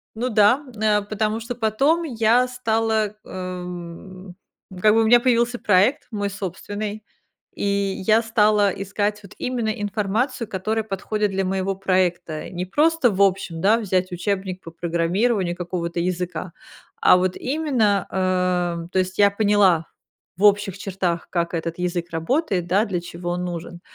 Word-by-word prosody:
Ну 240 +3 -1
да. 225 +5 +4
Н 220 - -8
э, 210 -1 +3
потому 215 +2 -2
что 235 +2 -5
потом 250 +9 +1
я 245 -3 +2
стала, 225 -3 0
ам 180 0 -8 0.5
как 215 +2 +5
бы 225 - +4
у - - +2
меня 240 +2 +7
появился 240 0 +1
проект 210 +9 +2
мой 205 -1 -2
собственный, 205 +2 -5 0.5
и - - -4 0.4
я 220 +1 +5
стала 210 -2 +3
искать 205 +2 -2
вот 195 - -13
именно 245 -3 -2
информацию, 215 +4 -1
которая 215 +3 -2
подходит 210 +1 -2
для 195 0 0
моего 190 +1 -1
проекта. 180 -4 -1
Не 180 0 -4
просто, 300 - +3
в 195 -1 -4
общем, 185 -4 +1
да, 210 +6 +4
взять 185 -4 -1
учебник 190 0 -3
по 165 - -9
программированию 175 +4 0
какого-то 175 -1 -4
языка, 180 0 -3 0.5
а - - +6
вот 185 0 0
именно, 255 -9 0
а 180 -2 0
То 190 - +3
есть 185 0 -3
я 200 -1 +6
поняла 200 -5 +3 0.5
в 195 - -2
общих 200 -2 +3
чертах, 185 -4 -2
как 170 -1 -1
этот 165 0 -3
язык 175 -1 -2
работает, 180 - 0
да, 195 +4 +3
для 190 -6 -2
чего 175 0 -6
он 180 +1 -2
нужен. 175 0 -6
200 Hz, 155 wpm, -22 LUFS, 180-220 Hz, 0.5 s, меня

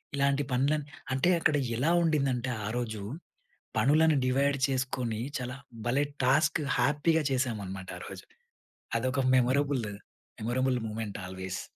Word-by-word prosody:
ఇలాంటి 140 +1 +2
పనులని 140 +4 +1 0.3
అంటే 135 +7 +2
అక్కడ 155 - +3 0.2
ఎలా 150 +7 +2
ఉండిందంటే 135 -5 +1 0.2
ఆరోజు 110 -2 -3 0.8
పనులను 155 +6 +4
డివైడ్ 140 +2 +2
చేసుకొని 130 -4 -1 0.2
చాలా 125 +1 -5 0.3
భలే 135 +4 +2 0.2
టాస్క్ 150 +4 +3 0.2
హ్యాపీగా 155 +3 +2
చేశామన్నమాట 105 -7 -2
ఆరోజు. - - -9 0.7
అదొక 130 +2 0
memorable 130 +1 +2
day, 105 - -5 0.5
memorable 125 +3 +1
moment 110 -2 -5
always. 95 0 -5
130 Hz, 110 wpm, -29 LUFS, 120-140 Hz, 0.8 s, పనులను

